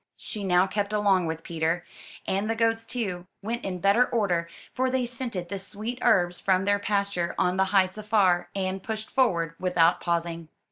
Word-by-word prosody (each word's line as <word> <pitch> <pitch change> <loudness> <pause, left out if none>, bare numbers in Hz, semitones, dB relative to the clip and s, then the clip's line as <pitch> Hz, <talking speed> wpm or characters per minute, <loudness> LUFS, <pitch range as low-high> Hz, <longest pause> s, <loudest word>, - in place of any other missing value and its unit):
She 210 -3 -6
now 180 -1 +4
kept 200 +1 -2
along 195 -4 +3
with 160 0 -4
Peter; 165 +1 -1 0.4
and 200 +3 -1
the 225 - +1
goats, 225 0 +1
too, 185 -7 -3 0.2
went 235 +4 -3
in 185 -2 -3
better 200 +7 +4
order, 180 -9 0 0.2
for 260 +1 +1
they 255 -1 0
scented 235 -8 -4
the 200 - -4
sweet 215 +5 -3
herbs 175 -1 +3
from 190 0 +2
their 205 0 +2
pasture 200 -4 -1
on 180 +1 +1
the 190 - +3
heights 190 0 +2
afar, 205 -5 +2
and 190 0 -2
pushed 220 +1 -5
forward 170 -12 +1
without 175 -2 +3
pausing. 170 -1 -2
195 Hz, 180 wpm, -26 LUFS, 175-215 Hz, 0.4 s, now